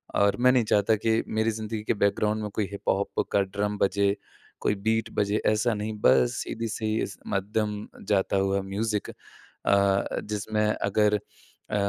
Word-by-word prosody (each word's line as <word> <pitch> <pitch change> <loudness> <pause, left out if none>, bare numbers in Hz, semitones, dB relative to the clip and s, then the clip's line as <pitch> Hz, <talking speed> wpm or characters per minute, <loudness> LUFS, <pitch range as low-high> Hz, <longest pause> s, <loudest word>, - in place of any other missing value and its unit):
और 100 -1 +3
मैं 125 +1 +6
नहीं 125 -2 +3
चाहता 105 +1 +3
कि 110 +1 +1
मेरी 110 +1 +1
ज़िंदगी 110 0 -4
के - - +1
बैकग्राउंड 105 +1 +1
में 105 - -3
कोई 105 -3 0
हिपहॉप 100 0 -1
का 100 - +4
ड्रम 100 +2 -2
बजे, 100 0 +2 0.5
कोई 105 - +2
बीट 110 +2 0
बजे, 105 +1 +1
ऐसा 110 +3 +2
नहीं 105 +1 -3
बस 120 +2 +4
सीधी 115 0 -4
सी, 110 0 -1 0.2
मध्यम 105 +1 -2 0.2
जाता 100 -1 +2
हुआ 95 0 +1
म्यूज़िक 105 +2 -2
अ - - -9 0.6
अ, 100 0 +2
जिसमें 105 +1 -1
अगर 105 0 +2 0.6
अ, - - 0
105 Hz, 160 wpm, -26 LUFS, 100-110 Hz, 0.6 s, मैं